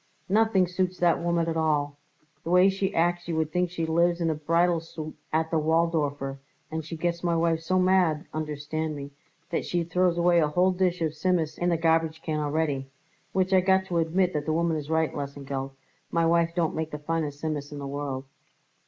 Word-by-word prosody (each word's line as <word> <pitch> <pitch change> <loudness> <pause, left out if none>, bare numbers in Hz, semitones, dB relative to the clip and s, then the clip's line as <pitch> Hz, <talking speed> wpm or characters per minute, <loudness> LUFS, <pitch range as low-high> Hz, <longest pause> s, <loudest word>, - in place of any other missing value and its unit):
Nothing 210 -2 +4
suits 185 +1 -2
that 175 -1 +2
woman 170 -1 +1
at 165 - -1
all. 150 -3 +1 0.5
The - - -5
way 180 +2 +6
she 195 0 -1
acts 175 +1 +1
you 170 - -2
would 160 -1 0
think 180 +1 +1
she 170 -2 -3
lives 170 +2 +2
in 165 -1 +1
the - - +2
bridal 165 +3 +2
soot 160 -1 -8 0.2
at 160 +1 0
the 165 - +2
Waldorfer, 150 -4 0 0.3
and 160 0 -3
she 165 +2 -7
gets 170 +1 -2
my 170 -1 +1
wife 165 0 +2
so 165 +3 0
mad, 185 -4 +3
understand 155 0 -3
me, 140 0 -7 0.4
that 170 - 0
she 175 -1 -1
throws 175 +1 +1
away 175 0 +4
a 155 - +3
whole 180 +5 +3
dish 180 -2 0
of 160 - 0
Tzimmus 160 0 0
in 175 - +1
the 170 - +2
garbage 160 -1 +1
can 155 -1 -1
already 145 -2 -1 0.4
which 190 0 +1
I 185 - +6
got 190 +1 +3
to 175 -3 -1
admit 180 +3 +1
that 150 0 -2
the 155 - +1
woman 165 0 +1
is 150 -1 -5
right, 160 -1 +1
Lesengeld 140 -1 -4 0.4
my 165 0 +1
wife 170 0 +2
don't 170 -3 +1
make 160 0 -3
the 150 - -5
finest 150 -1 -3
Tzimmus 150 -2 -3
in 145 - -7
the 140 - -5
world." 140 -1 -4
165 Hz, 210 wpm, -27 LUFS, 155-175 Hz, 0.5 s, way